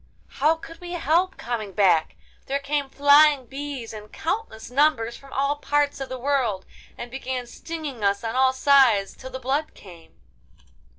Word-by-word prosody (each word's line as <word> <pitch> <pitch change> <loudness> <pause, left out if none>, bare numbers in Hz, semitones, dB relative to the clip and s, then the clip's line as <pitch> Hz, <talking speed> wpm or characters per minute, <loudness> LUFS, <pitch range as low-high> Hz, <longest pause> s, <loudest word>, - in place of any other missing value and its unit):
'How 305 +4 +4
could 330 +1 -12
we 350 0 -7
help 345 +3 +1
coming 225 -4 -4
back? 180 -6 +3 0.3
There 275 - 0
came 280 0 -2
flying 285 0 +5
bees 270 -2 -6
in 210 -1 -10
countless 315 - -4
numbers 250 -4 +2
from 275 -1 -15
all 280 +2 0
parts 290 -1 0
of 270 - -5
the 260 - -5
world, 250 -7 0 0.3
and 240 0 -7
began 260 -1 -4
stinging 290 -2 -7
us 200 +1 +1
on 225 +1 -3
all 260 0 +4
sides 260 -7 +4
till 260 - -10
the 260 - -6
blood 270 +4 -2
came! 170 -4 -15
270 Hz, 165 wpm, -24 LUFS, 230-290 Hz, 0.3 s, flying